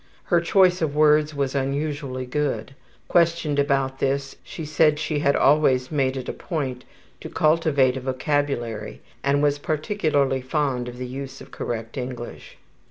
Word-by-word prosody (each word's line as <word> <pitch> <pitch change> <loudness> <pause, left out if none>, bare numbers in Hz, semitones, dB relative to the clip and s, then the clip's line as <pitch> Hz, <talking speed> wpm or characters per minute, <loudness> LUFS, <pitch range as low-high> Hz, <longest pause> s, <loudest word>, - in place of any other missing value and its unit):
Her 175 -1 +2
choice 180 +1 +4
of 150 -3 -1
words 150 0 +4
was 140 -2 -1
unusually 140 -1 -2
good. 135 -2 -2 0.3
Questioned 165 -4 +2
about 135 -2 +1
this 135 0 -1
she 160 - -7
said 150 0 +3
she 155 0 -1
had 140 -1 +2
always 135 -2 +3
made 135 -3 0
it 130 - -5
a - - -3
point 130 -7 -4 0.3
to - - -8
cultivate 155 -5 +2
a - - -5
vocabulary 130 -4 -2 0.2
and 140 +1 +2
was 145 0 +2
particularly 150 -4 0
fond 130 -2 -1
of 125 - -10
the 125 - -4
use 135 +2 -7
of - - -13
correct 115 0 -5
English. 125 -1 -7
140 Hz, 155 wpm, -24 LUFS, 130-150 Hz, 0.3 s, choice